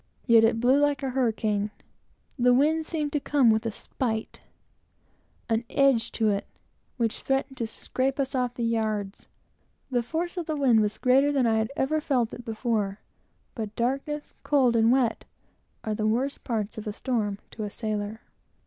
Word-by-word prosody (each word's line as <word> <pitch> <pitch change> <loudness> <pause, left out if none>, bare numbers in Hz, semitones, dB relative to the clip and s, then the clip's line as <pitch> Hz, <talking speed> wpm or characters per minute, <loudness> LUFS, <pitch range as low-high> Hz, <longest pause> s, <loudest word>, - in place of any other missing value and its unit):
Yet 230 -3 +6
it 225 0 +3
blew 255 +4 +4
like 290 -1 +1
a 265 - -1
hurricane. 220 -5 0 0.7
The 245 0 +5
wind 310 +4 +2
seemed 300 -3 -2
to 295 - +2
come 275 -5 +3
with 220 +1 +1
a - - -1
spite, 220 0 -4 1.1
an 225 0 +1
edge 270 -5 +3
to 220 -2 +2
it, 200 0 -2 0.5
which 230 -3 -1
threatened 270 0 -1
to 230 - -2
scrape 260 +4 -2
us 270 -1 -1
off 250 -2 -1
the 240 - -3
yards. 215 -3 -2 0.6
The 250 - +1
mere - - +3
force 330 +9 -3
of 345 - -3
the 310 - -1
wind 255 -6 +4
was 210 0 -1
greater 270 +3 +4
than 270 -3 +2
I 225 -1 +3
had 220 +3 -1
ever 305 +3 0
seen 255 -6 +1
it 245 - -8
before; 220 -3 -2 0.5
but 215 -3 -5
darkness, 275 +5 -2
cold, 260 -5 +3
and 225 0 +4
wet 250 -3 +2 0.6
are 215 - -2
the 215 0 -1
worst 255 +6 -1
parts 220 -3 -3
of 215 - -8
a 210 - -2
storm 215 -4 -1
to 220 - -6
a 210 - -3
sailor. 215 0 -4
240 Hz, 180 wpm, -27 LUFS, 220-270 Hz, 1.1 s, Yet